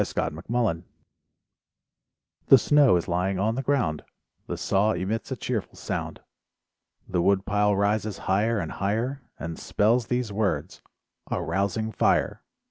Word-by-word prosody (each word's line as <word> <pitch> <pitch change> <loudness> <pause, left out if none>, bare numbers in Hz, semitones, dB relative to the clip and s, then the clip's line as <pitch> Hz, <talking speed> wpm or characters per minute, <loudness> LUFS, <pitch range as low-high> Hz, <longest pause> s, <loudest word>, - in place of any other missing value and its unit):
CHEERFUL 80 - -3
THOUGHTS 115 -9 0 1.6
The 135 - +9
snow 145 -3 +5
is 85 - -1
lying 90 +2 0
on 105 +4 +1
the 130 - -2
ground, 125 - 0 0.4
The - - -4
saw 105 +3 +2
emits 110 +7 -3
a - - 0
cheerful 120 -4 -3
sound, - - -4 0.9
The 90 -2 0
wood 100 +1 +2
pile 105 0 +2
rises 105 +1 0
higher 105 +5 +2
and - - -3
higher, 115 +8 -2 0.2
And 80 0 -6
spells 115 +2 +1
these 125 -4 -1
words, 95 -6 -1 0.5
"A - - -1
rousing 100 +3 -1
fire." - - +1
105 Hz, 135 wpm, -26 LUFS, 95-115 Hz, 1.6 s, The